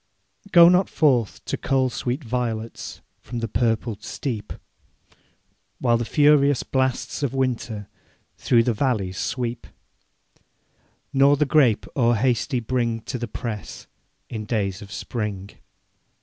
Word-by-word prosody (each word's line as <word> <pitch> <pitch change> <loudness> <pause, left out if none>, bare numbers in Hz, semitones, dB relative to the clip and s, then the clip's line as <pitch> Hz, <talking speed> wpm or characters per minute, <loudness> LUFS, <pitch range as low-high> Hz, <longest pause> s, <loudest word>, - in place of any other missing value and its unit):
Go 170 -1 +9
not 180 +2 +4
forth 125 - +1
to - - -2
cull 130 -2 +1
sweet 125 +5 -3
violets 115 -2 -4 0.2
From 120 - -7
the 115 0 -2
purpled 115 -1 -1
steep, 115 -2 -5 1.3
While 120 0 +2
the 120 - -2
furious 145 -1 +4
blasts 130 0 -1
of 135 -2 -1
winter 120 -5 -2 0.5
Through 115 -2 +3
the 120 - +1
valleys 105 -6 -1
sweep; 120 -2 -3 1.5
Nor 140 +1 +5
the 150 - +2
grape 135 -6 +3
o'erhasty 120 +1 +2
bring 115 -1 -1
To 125 - -5
the 120 - -3
press 105 - -6 0.4
in 110 -2 -5
days 100 -4 -2
of 100 -1 -11
spring. 105 -5 -4
120 Hz, 120 wpm, -23 LUFS, 110-135 Hz, 1.5 s, Go